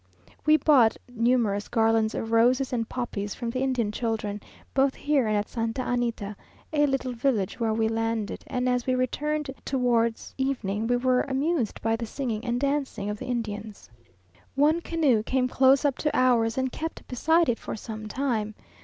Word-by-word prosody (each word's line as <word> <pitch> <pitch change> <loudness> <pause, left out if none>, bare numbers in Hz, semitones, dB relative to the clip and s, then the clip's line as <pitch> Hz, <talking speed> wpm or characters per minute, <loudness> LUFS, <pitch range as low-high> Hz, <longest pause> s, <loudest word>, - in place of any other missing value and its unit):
We 310 0 +7
bought 265 -6 +4
numerous 230 -4 +1
garlands 225 -1 +2
of 225 - -3
roses 250 +3 +3
and 230 -2 -1
poppies 205 -5 -4
from 235 -2 -4
the 255 - -3
Indian 250 -5 0
children, 210 -2 -2 0.3
both 270 0 +2
here 285 -5 +1
and 215 -1 +1
at 205 - -1
Santa 230 +2 -2
Anita, 235 -4 -2 0.4
a 295 -1 +3
little 270 -2 -1
village 230 -6 0
where 225 -2 +1
we 220 0 +2
landed, 225 -1 -2
and 250 -1 -1
as 250 0 0
we 255 - +2
returned 295 +3 -1
towards 235 -3 0
evening 225 -6 -1
we 245 - +2
were 255 0 +2
amused 275 - -1
by 225 0 +2
the 230 0 -5
singing 230 -3 -3
and 240 -1 -1
dancing 275 -7 -1
of 210 - -6
the - - -6
Indians. 215 - -5 0.6
One 305 +4 +3
canoe 300 -10 +2
came 255 +3 0
close 265 +2 +4
up 275 -3 +1
to 300 - 0
ours, 240 -2 +3
and 260 -1 0
kept 325 +5 -6
beside 320 +6 +2
it 235 - 0
for - - -5
some 215 0 -7
time. 215 -3 -2
245 Hz, 175 wpm, -26 LUFS, 225-265 Hz, 0.6 s, We